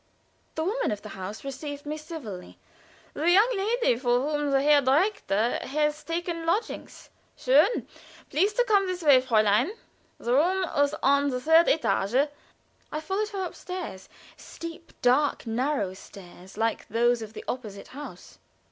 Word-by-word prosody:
The 315 - -1
woman 450 +9 0
of 205 -1 -4
the 215 - -8
house 195 +2 -7
received 285 +1 -6
me 300 +1 -3
civilly. 300 - -8 0.6
"The 320 +4 0
young 425 +7 +5
lady 410 - +1
for 245 -1 +2
whom 295 +1 -1
the 275 -1 +3
Herr 295 0 +5
Direktor 265 - +1
had 300 +2 0
taken 335 0 -3
lodgings? 365 +8 -3 0.3
Schon! 295 - +3 0.5
Please 385 +7 +2
to - - +3
come 405 -5 +3
this 365 -1 -4
way, 280 -4 +6
Fräulein. 215 - +2 0.4
The 240 - -2
room 360 +8 +3
was 285 0 +2
on 280 +1 +3
the 250 -2 -2
third 320 +5 +5
étage." 270 -2 +2 0.6
I 305 - -2
followed 390 +6 -2
her 390 -3 -3
upstairs 355 - -7 0.3
steep, 335 0 -9
dark, 260 +4 +2
narrow 235 -3 -1
stairs, 190 0 -13
like 225 0 -1
those 235 +2 +2
of 220 -1 -8
the - - -9
opposite 215 -6 -6
house. 290 +3 -10
290 Hz, 150 wpm, -27 LUFS, 240-340 Hz, 0.6 s, way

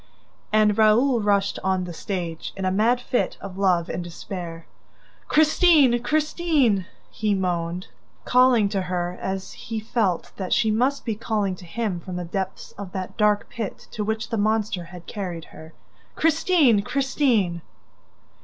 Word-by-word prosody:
And 215 0 +3
Raoul 230 +3 +4
rushed 200 -1 +1
on 190 -1 +1
the 175 -1 -6
stage, 170 -3 -4
in 190 - -3
a 185 - +1
mad 225 +6 +3
fit 245 0 -1
of 195 -1 -8
love 180 -4 +2
and 175 - -4
despair. 175 -1 -7 0.6
"Christine! 305 -5 +5
Christine!" 300 - +1 0.2
he 210 -2 0
moaned, 180 -1 -2 0.4
calling 250 -4 +5
to 195 -1 -1
her 180 -1 -2
as 190 0 -4
he 225 -1 -5
felt 215 -5 -1
that 185 -2 -1
she 220 - +3
must 255 +6 +1
be 225 - 0
calling 210 -3 -1
to 180 - -12
him 200 0 -2
from 185 +1 -7
the 180 0 -3
depths 190 +2 -4
of 195 -3 -7
that 190 -1 -5
dark 210 -1 +2
pit 225 -4 -6
to 215 - -3
which 220 +1 -2
the 225 - 0
monster 215 -4 0
had 175 -1 -11
carried 180 -5 -5
her. 160 0 -11 0.4
"Christine! 315 - +3
Christine!" 240 - +1
205 Hz, 155 wpm, -24 LUFS, 185-235 Hz, 0.6 s, Christine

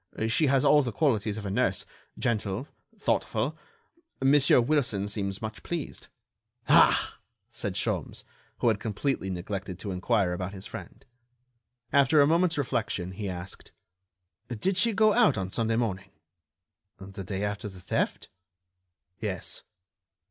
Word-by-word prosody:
She 145 +7 +3
has 135 -1 +3
all 150 - +6
the 125 -4 -2
qualities 110 -6 +1
of 105 - -6
a 100 - -3
nurse... - - +1 0.3
gentle... 110 +1 -1 0.3
thoughtful... - - 0 0.6
Monsieur 135 0 +5
Wilson 120 -6 +1
seems 100 -1 -3
much 110 0 -5
pleased...." 170 -3 -5 0.6
"Ah!" - - +5 0.3
said - - -3
Sholmes, - - -2 0.3
who 120 - +2
had 110 -2 +1
completely 110 0 -2
neglected 95 +1 -4
to 100 +1 -5
inquire 95 0 +1
about 90 +2 -4
his 95 0 -9
friend. - - -9 0.9
After 140 +2 +5
a 140 - +7
moment's 165 +2 +2
reflection 110 -9 -1
he 100 +1 -5
asked: 90 0 -8 0.7
"Did 125 - -1
she 230 +4 +4
go 215 +1 +4
out 235 - +4
on 95 -1 -3
Sunday 115 +1 0
morning?" 100 -5 -2 0.9
"The 95 0 -8
day 95 +1 -3
after 105 +1 -3
the 95 -1 -12
theft?" 90 - -2 0.9
"Yes." 100 -6 -4
110 Hz, 135 wpm, -28 LUFS, 95-135 Hz, 0.9 s, a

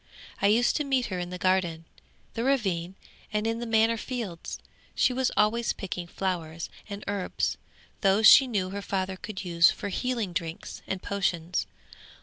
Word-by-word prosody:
I 200 - +4
used 230 +4 +3
to 300 - 0
meet 265 -3 +1
her 185 -2 -3
in 175 0 -4
the 180 - -5
garden, 180 -3 +1 0.5
the 230 - -2
ravine, 190 -10 0 0.4
and 210 0 -1
in 225 0 0
the 240 - -4
manor 225 +1 +3
fields. 220 -9 -5 0.4
She 255 - +3
was 255 0 +1
always 230 +3 +2
picking 180 -3 -5
flowers 170 -3 -3 0.2
and 200 0 -6
herbs, 200 -2 -1 0.5
those 195 +2 +4
she 270 +4 +9
knew 195 -6 -1
her 200 +1 -4
father 190 -1 -2
could 190 0 -7
use 170 -1 +5
for 205 - -4
healing 230 -3 -2
drinks 165 -1 -5
and 190 -1 -3
potions. 180 -3 -1
195 Hz, 165 wpm, -27 LUFS, 180-225 Hz, 0.5 s, she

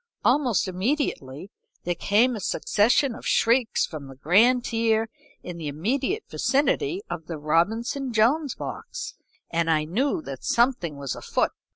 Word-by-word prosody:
Almost 245 - +2
immediately 185 - -2 0.3
there 175 - 0
came 220 +8 +2
a - - -5
succession 235 +7 +2
of - - -11
shrieks 235 0 +2
from 150 -4 -8
the 135 - -11
grand 225 - +4
tier 225 -1 +1 0.3
in 180 -1 -7
the 160 -3 -5
immediate 255 - -1
vicinity 360 +8 0
of 160 -2 -6
the 165 - -5
Robinson 220 - 0
Jones 255 +7 +2
box, - - -6 0.4
and 165 0 0
I 155 -1 +3
knew 215 - -1
that 135 -1 -8
something 235 - +1
was 140 -3 -4
afoot. - - -1
220 Hz, 145 wpm, -25 LUFS, 165-260 Hz, 0.4 s, grand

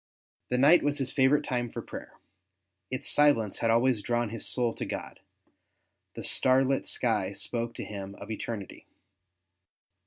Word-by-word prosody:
The 125 - +1
night 150 +7 +6
was 145 0 0
his 135 -1 0
favourite 135 +2 +3
time 120 -3 -2
for - - -6
prayer; - - -9 0.8
its 130 +2 -2
silence 130 -9 +4
had 115 - +1
always 120 0 +3
drawni 120 0 -1
his 115 - -5
soul 120 -2 0
to - - -5
God; - - -6 1.0
the - - -6
starlit 130 +1 +2
sky 105 -5 0
spoke 115 +2 -3
to - - -5
him 100 -1 -7
of 100 +2 -9
eternity. 110 -3 -6
120 Hz, 150 wpm, -28 LUFS, 110-130 Hz, 1.0 s, night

